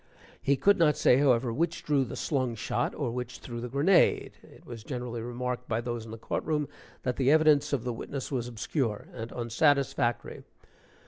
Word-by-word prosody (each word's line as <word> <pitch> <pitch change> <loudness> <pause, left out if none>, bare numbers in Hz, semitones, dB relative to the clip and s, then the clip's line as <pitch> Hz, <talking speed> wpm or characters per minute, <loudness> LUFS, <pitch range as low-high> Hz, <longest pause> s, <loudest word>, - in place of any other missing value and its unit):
He 140 - +2
could 200 +7 +3
not 150 -3 +4
say, 125 - +5
however, 125 -4 +3
which 170 +6 -1
drew 140 -3 +2
the - - -7
slung 130 -5 -1
shot 110 - -2
or 135 -6 -2
which 125 0 -5
threw 120 -2 -7
the 125 - -5
grenade. 150 +9 +3
(It - - -18
was 115 -3 -9
generally 120 -1 -5
remarked 125 +1 -4
by 115 -1 0
those 120 -1 -4
in - - -11
the 115 - -7
court 115 - -3
room, 150 -2 -1 0.4
that 125 -2 -1
the 135 -1 +2
evidence 155 -1 +4
of 135 -5 0
the 125 -1 -2
witness 135 +4 -6
was 125 -3 -2
obscure 115 -1 -3
and 115 -1 -6
unsatisfactory. 120 0 0
125 Hz, 190 wpm, -29 LUFS, 120-140 Hz, 0.4 s, say